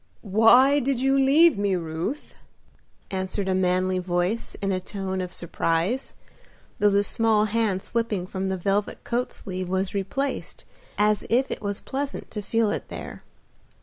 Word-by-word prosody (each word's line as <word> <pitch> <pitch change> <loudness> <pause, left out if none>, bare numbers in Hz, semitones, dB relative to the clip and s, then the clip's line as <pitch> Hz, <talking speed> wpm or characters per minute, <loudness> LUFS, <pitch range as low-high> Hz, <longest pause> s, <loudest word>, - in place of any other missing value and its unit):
"Why 250 +7 +6
did 270 -1 0
you 270 +1 +2
leave 280 -1 +5
me, 200 -2 +1
Ruth?" 170 - -4 0.8
answered 190 +1 -2
a 190 - +1
manly 185 0 +1
voice 180 +4 -1
in 195 -1 -1
a 185 - 0
tone 190 0 -4
of 180 -1 -5
surprise, 170 +8 -1 0.6
though 205 - +5
the 200 0 +3
small 220 0 +2
hand 215 -3 0
slipping 225 -6 -2
from 190 0 -3
the 190 - -1
velvet 200 +3 -1
coat 245 +1 -1
sleeve 185 -2 -6
was 190 0 0
replaced 205 +8 -3 0.3
as 210 0 +2
if 255 +3 +2
it - - -4
was 200 -1 -2
pleasant 275 +1 -5
to 210 - -4
feel 220 +1 +1
it - - -4
there. - - -8
200 Hz, 155 wpm, -25 LUFS, 185-230 Hz, 0.8 s, Why